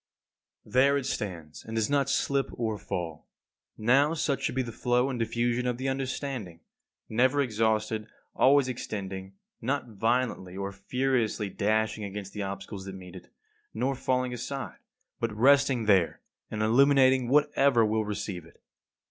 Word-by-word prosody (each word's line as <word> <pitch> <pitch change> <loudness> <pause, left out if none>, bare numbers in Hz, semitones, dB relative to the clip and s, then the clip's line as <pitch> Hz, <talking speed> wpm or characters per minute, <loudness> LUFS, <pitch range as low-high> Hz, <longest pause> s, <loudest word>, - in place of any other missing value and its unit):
There 140 +2 +3
it 140 - -3
stands 85 - -5
and 110 - -7
does 110 -1 +1
not 140 -1 +1
slip 140 0 +1
or 110 -3 -2
fall. 85 -5 -5 0.5
Now, 135 +8 +3
such 140 -3 0
should - - -2
be 130 - +1
the 120 - -6
flow 125 +3 +1
and 125 - -4
diffusion 120 +2 0
of 125 -1 -1
the 130 +1 -2
understanding; 130 - -4 0.5
never 130 +5 +2
exhausted, 110 -3 0 0.3
always 135 0 +5
extending; 95 -6 -5 0.3
not 130 +1 -2
violently 115 -4 -1
or 100 0 -3
furiously 115 +1 -1
dashing 110 +2 0
against 100 0 -6
the 105 - -4
obstacles 95 0 -6
that 95 -1 -7
meet 90 -1 -11
it, 90 - -12 0.4
nor 135 +2 0
falling 125 -1 -1
aside, 130 +3 -5 0.4
but 115 -1 -1
resting 135 -1 +4
there 95 -5 +3 0.3
and 110 0 -2
illuminating 130 +2 +4
whatever 140 -4 +4
will 110 +1 +1
receive 100 -4 -4
it. 85 - -19
115 Hz, 150 wpm, -28 LUFS, 105-130 Hz, 0.5 s, always